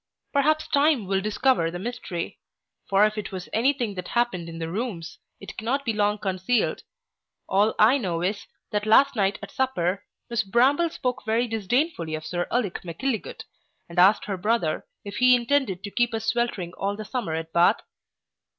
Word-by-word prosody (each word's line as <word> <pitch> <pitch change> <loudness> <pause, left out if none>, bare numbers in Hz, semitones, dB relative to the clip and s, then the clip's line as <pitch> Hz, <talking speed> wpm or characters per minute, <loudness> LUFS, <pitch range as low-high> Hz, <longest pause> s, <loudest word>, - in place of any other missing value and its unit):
Perhaps 310 +2 +2
time 285 -6 +3
will 190 0 0
discover 215 -3 +2
the 175 - -5
mystery; 190 -5 -5 0.5
for 200 +1 +5
if 215 0 -1
it 210 - -6
was 185 -2 -6
any 240 +5 +3
thing 240 -7 -3
that 180 -2 -6
happened 235 -9 -1
in 165 - -8
the 165 -1 -4
Rooms, 185 -3 -5 0.2
it - - -9
cannot 265 +6 -1
be 225 - 0
long 210 0 +1
concealed 195 +3 0 0.7
All 205 +3 +2
I 240 +6 +5
know 175 -7 -2
is, 200 +3 -2 0.2
that 210 0 -1
last 275 +5 +5
night 200 -2 +1
at 200 - -8
supper, 200 -8 -1 0.2
miss 235 -2 0
Bramble 260 - +3
spoke 250 -5 -3
very 225 +3 +1
disdainfully 225 - -1
of 155 0 -7
Sir 175 0 -2
Ulic 225 -7 -1
Mackilligut, 215 +8 -4 0.4
and 170 +1 -3
asked 195 +4 +5
her 195 -2 -3
brother 195 -4 0 0.2
if 200 0 -6
he 250 0 +6
intended 240 -6 0
to 205 - -6
keep 240 0 +1
us 220 0 -4
sweltering 220 -7 -1
all 200 +2 -2
the 215 +1 -7
summer 215 -9 -3
at 160 0 -5
Bath? 170 0 +4
215 Hz, 180 wpm, -25 LUFS, 185-245 Hz, 0.7 s, he